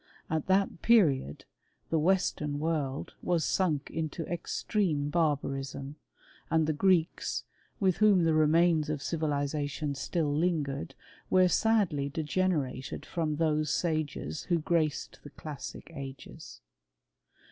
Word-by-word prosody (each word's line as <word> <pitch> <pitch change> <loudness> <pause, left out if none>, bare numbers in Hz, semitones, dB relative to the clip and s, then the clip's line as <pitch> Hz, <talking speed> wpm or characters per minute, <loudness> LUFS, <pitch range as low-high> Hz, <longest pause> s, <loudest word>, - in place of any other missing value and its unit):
At 160 -2 -1
that 190 -2 +2
period 150 - +3 0.5
the 165 - +3
western 155 -4 +1
world, 150 -3 -2
was 170 -3 +1
sunk 155 -7 0
into 160 +1 -3
extreme 170 -3 -1
barbarism, 140 -3 -1 0.5
and 160 -1 +2
*ke 155 - 0
Greeks, 180 -1 +1 0.4
with 190 -3 +2
whom 205 -4 +5
the 165 -1 +3
remains 155 0 +3
of 150 -2 -2
civilization 145 -1 -1
still 150 +1 -1
'ingered, 145 -6 -1 0.3
were 185 0 +5
sadly 180 -9 +2
degenerated 150 -3 -1
from 160 -3 -2
those 155 -1 +1
sages 155 - -2
Ho 175 - +2
OTaced 160 -2 -1
the 145 - -11
classic 150 +3 -8
ao^es. 135 -2 -9
155 Hz, 115 wpm, -30 LUFS, 145-175 Hz, 0.5 s, whom